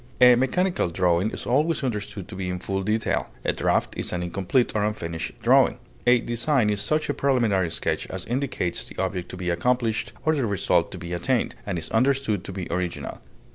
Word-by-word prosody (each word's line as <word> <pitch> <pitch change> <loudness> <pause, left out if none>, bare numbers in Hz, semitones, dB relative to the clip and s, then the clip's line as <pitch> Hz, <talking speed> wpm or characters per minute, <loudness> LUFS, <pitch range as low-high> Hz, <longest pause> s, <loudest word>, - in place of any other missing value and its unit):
A 125 -1 +9
mechanical 135 - +1
drawing 90 +3 +2
is - - -6
always 150 +6 +1
understood 105 -6 -3
to - - -8
be 90 -1 -3
in 90 - -2
full 95 +2 -2
detail; 105 +3 0 0.2
a - - +2
draft - - 0
is - - -3
an 90 -1 -2
incomplete 95 +8 +1
or 105 - +2
unfinished 85 -6 -3
drawing; - - +5 0.3
a 125 0 +7
design 120 -1 +1
is 105 0 0
such 155 +9 0
a 145 - 0
preliminary 115 -12 +2
sketch - - -2
as 95 -1 -6
indicates 125 -8 -1
the - - -12
object 95 -2 -2
to - - -7
be 90 -1 -1
accomplished 115 +5 0
or 155 - +4
the 135 -6 0
result 90 -4 +1
to - - -6
be 85 -1 -6
attained, 120 +8 0
and 95 -3 -1
is 80 - -5
understood 125 -5 +2
to - - -5
be 95 -2 -5
original. 90 0 -3
105 Hz, 200 wpm, -25 LUFS, 90-125 Hz, 0.3 s, A